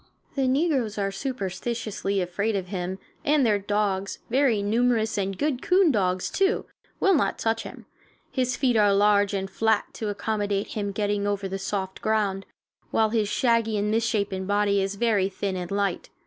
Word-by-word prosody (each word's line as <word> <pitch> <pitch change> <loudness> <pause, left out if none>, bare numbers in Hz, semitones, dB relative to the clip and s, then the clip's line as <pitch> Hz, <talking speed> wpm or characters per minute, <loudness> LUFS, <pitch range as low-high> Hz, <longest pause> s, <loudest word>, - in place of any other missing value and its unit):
The 270 -2 +1
negroes 265 -6 +1
are 195 -1 0
superstitiously 200 -3 -3
afraid 200 +5 -1
of 185 -2 -3
him, 185 -1 -3 0.3
and 295 -3 +3
their 210 -3 +3
dogs, 200 -1 -1
very 250 -6 +3
numerous, 225 +1 +1
and 195 -1 -2
good 285 -4 -1
coon 365 -3 +4
dogs, 185 -5 0
too, 390 +2 +1 0.3
will 390 - +4
not 295 - +1
touch 225 0 0
him. - - -10 0.5
His 255 -2 0
feet 255 -4 +2
are 205 -2 +4
large 205 0 +3
and 195 0 -2
flat, 220 +2 0
to 215 - -4
accommodate 205 -1 -1
him 205 -2 -3
in 200 - -4
getting 205 0 0
over 200 -1 -1
the 195 +1 -4
soft 190 -1 -3
ground, 205 -3 0 0.4
while 220 -1 +2
his 220 -3 +1
shaggy 230 -1 +2
and 205 +1 0
misshapen 205 -4 0
body 205 -1 +2
is 195 +1 -2
very 205 -3 +2
thin 195 0 -3
and 180 -1 -4
light. 200 -2 -1
205 Hz, 175 wpm, -25 LUFS, 195-230 Hz, 0.5 s, coon